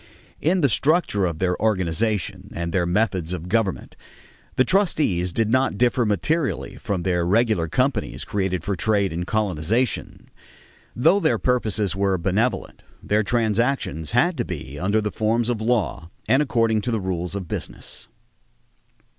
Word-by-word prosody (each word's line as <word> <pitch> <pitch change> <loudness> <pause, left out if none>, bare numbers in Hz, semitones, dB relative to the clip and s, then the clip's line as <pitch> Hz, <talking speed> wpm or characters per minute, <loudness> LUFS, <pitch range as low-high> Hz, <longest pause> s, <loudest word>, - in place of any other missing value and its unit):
In 180 +4 +2
the 140 - +5
structure 135 - +2
of 85 -2 -4
their 90 +1 +1
organization 100 0 0
and 85 0 -3
their 90 -2 +1
methods 90 -3 0
of 90 -1 -5
government, 100 -1 -1 0.6
the 130 - +4
trustees 150 - +2
did 110 +4 0
not 130 -5 +2
differ 120 0 +2
materially 150 +8 -1
from 100 -7 -3
the 90 -2 +1
regular 105 -2 +2
companies 125 - -1
created 95 -4 -1
for 100 0 -1
trade 100 -1 +1
and 90 +2 -3
colonization. 110 +4 -1 0.6
Though 165 +11 +4
their 160 -5 +2
purposes 110 -6 0
were 95 -1 +1
benevolent, 100 +8 -1 0.2
their 105 +1 +2
transactions 110 - 0
had 160 +9 +2
to 120 - 0
be 75 - -7
under 100 +4 +1
the 105 0 -2
forms 115 +2 0
of 115 -3 -1
law 110 -7 0 0.2
and 135 - +4
according 115 -6 +1
to 120 - -3
the 110 - 0
rules 90 -1 -3
of 95 -3 -4
business. - - -5
105 Hz, 150 wpm, -23 LUFS, 90-120 Hz, 0.6 s, the